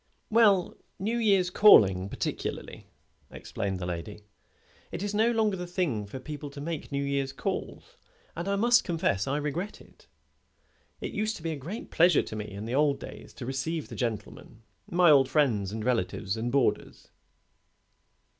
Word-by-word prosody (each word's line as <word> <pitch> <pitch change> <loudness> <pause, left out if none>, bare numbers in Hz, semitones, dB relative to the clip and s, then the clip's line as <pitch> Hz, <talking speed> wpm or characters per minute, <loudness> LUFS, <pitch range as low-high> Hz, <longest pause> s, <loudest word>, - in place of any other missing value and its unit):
"Well, 205 -5 +4 0.2
New 225 +5 -1
Year's 195 -5 +3
calling 100 - +6
particularly," - - -5 0.4
explained 95 -1 -4
the 90 - -5
lady. 90 +4 -5 0.7
"It - - -4
is 205 0 -3
no 220 +3 +3
longer 220 -4 +1
the 180 -1 -6
thing 165 - -2
for 130 +6 -7
people 150 +1 -7
to 140 0 -10
make 155 +1 -5
New 140 0 -1
Year's 140 -1 -1
calls, - - -5 0.4
and 170 +3 -4
I 200 - +1
must 240 +4 +4
confess 160 - 0
I 140 +2 0
regret 155 +7 -3
it. - - -20 0.9
It - - -4
used 215 +1 -1
to 160 - -13
be 165 - -2
a - - -3
great 175 - -7
pleasure 175 +2 +4
to - - -7
me 105 0 -5
in 100 +1 -7
the 115 - -4
old 145 0 +2
days - - -10
to 130 - -7
receive 135 +5 -3
the - - -8
gentlemen 115 -1 -5 0.3
my 175 -2 +5
old 135 -3 +5
friends, 110 -11 +1
and 110 0 -5
relatives, 100 -4 -1
and 115 +2 -3
boarders." 135 -2 0
145 Hz, 170 wpm, -28 LUFS, 115-185 Hz, 0.9 s, calling